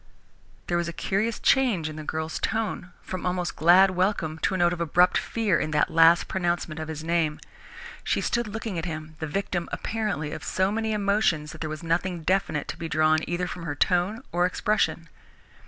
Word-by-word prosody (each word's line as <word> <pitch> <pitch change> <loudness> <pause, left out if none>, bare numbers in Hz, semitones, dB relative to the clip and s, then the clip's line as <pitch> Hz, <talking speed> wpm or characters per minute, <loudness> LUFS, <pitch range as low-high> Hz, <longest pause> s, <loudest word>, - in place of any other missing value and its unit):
There 175 - 0
was 175 0 -1
a 170 - -4
curious 210 +6 -1
change 235 - +2
in 155 - -6
the 155 - -7
girl's 160 +1 -3
tone, 210 -4 -2
from 185 -1 -5
almost 180 -1 -2
glad 180 +4 +6
welcome 180 -4 -1
to 190 - 0
a - - 0
note 175 -1 +3
of 170 - -5
abrupt 175 +2 +3
fear 215 -8 +1
in - - -2
that 150 +1 +2
last 165 +1 +5
pronouncement 175 -3 -2
of 155 - -5
his 155 -1 -6
name. 165 -2 0 0.6
She - - 0
stood 235 -2 0
looking 220 -4 -4
at 165 - -4
him, 155 -2 -6
the 155 - -3
victim, 175 +1 -2
apparently, 210 -10 -2
of - - -6
so 190 +1 0
many 220 +1 -1
emotions 200 -7 +1
that 160 - -12
there 155 - -2
was 155 +2 -6
nothing 170 +1 -1
definite 160 -5 0
to - - -5
be 165 -1 -5
drawn 155 0 +3
either 175 +1 -1
from 180 - -6
her 155 -3 -4
tone 180 +8 +1
or 175 +1 +2
expression. 185 -3 0
175 Hz, 200 wpm, -26 LUFS, 160-195 Hz, 0.6 s, glad